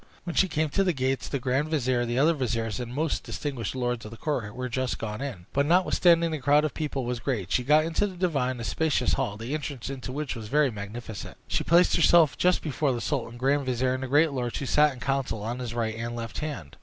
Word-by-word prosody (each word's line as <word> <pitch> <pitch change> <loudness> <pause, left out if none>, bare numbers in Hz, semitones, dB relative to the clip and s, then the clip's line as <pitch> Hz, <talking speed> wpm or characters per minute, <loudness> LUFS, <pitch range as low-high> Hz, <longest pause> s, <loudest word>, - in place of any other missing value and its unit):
When 175 -2 -5
she 190 - +4
came 155 -3 0
to 195 +7 +1
the 180 -2 +1
gates, 130 -1 -1
the 140 - -2
grand 130 +3 0
vizier, 130 -6 0
the 120 +1 -1
other 155 +5 +4
viziers, 115 -6 -2
and 120 -1 -5
most 150 +4 -1
distinguished 130 -7 -4
lords 125 -2 -1
of 105 - -8
the 115 - -10
court 120 -9 -3
were 130 0 -3
just 130 +1 -2
gone 105 +1 -5
in; 120 -11 -5
but 140 +1 +2
notwithstanding 170 -1 +4
the 155 - -2
crowd 145 +3 +4
of 155 - -2
people 140 -5 -3
was 120 0 -2
great, 115 -8 -2
she 125 - +2
got 150 +4 +4
into 165 +5 0
the 190 - -8
divan, 140 -9 0
a - - -4
spacious 150 -1 +1
hall, 100 0 -1
the 115 +5 -5
entrance 140 -4 -4
into 130 -2 -6
which 145 0 -3
was 110 -2 -7
very 145 +2 +3
magnificent. 105 0 -7
She - - 0
placed 170 +2 +4
herself 165 -3 +5
just 180 0 +2
before 145 -2 0
the 120 - -2
sultan, 120 -3 -3
grand 135 +2 +1
vizier, 130 0 +1
and 130 - -3
the 130 - -3
great 150 +4 +4
lords, 125 -3 -2
who 140 - -3
sat 150 +3 +4
in 130 - -10
council 130 -5 -1
on 120 +3 -3
his 120 -2 -5
right 115 -2 -1
and 115 +1 -4
left 115 -2 -5
hand. 140 - -6
130 Hz, 245 wpm, -27 LUFS, 120-150 Hz, -, herself